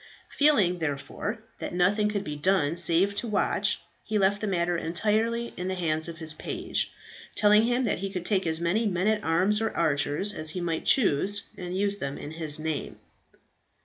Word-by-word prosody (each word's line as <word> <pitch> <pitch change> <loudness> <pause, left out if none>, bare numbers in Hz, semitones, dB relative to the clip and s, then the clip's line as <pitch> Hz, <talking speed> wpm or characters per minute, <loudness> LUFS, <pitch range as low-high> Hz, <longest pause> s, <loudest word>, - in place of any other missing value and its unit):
Feeling, 210 -13 +3
therefore, 160 - -4 0.2
that - - -5
nothing 205 +4 +2
could 205 -1 -2
be 150 -5 -5
done 160 -1 +1
save 175 +3 +3
to 240 - -2
watch, 210 -2 +1 0.2
he 215 - -1
left 200 +1 +2
the 215 - -1
matter 175 -2 0
entirely 220 +8 -1
in 180 - -4
the 190 - -2
hands 160 -3 -1
of 165 -1 -7
his 160 -1 -3
page, - - -3 0.4
telling 210 +1 +5
him 245 +2 +1
that 215 -7 0
he 195 +1 -3
could 180 -2 -5
take 195 -4 +1
as 160 0 0
many 190 +7 +1
men 185 -1 -1
at 215 0 +1
arms 185 +6 +2
or 225 - +1
archers 150 +5 +1
as 155 -4 -4
he 180 - -3
might 170 -2 -2
choose 200 - +3
and 180 0 -5
use 200 +1 +1
them 140 0 -4
in 150 - -7
his 160 -2 -1
name. 155 -1 -4
185 Hz, 190 wpm, -27 LUFS, 165-210 Hz, 0.4 s, telling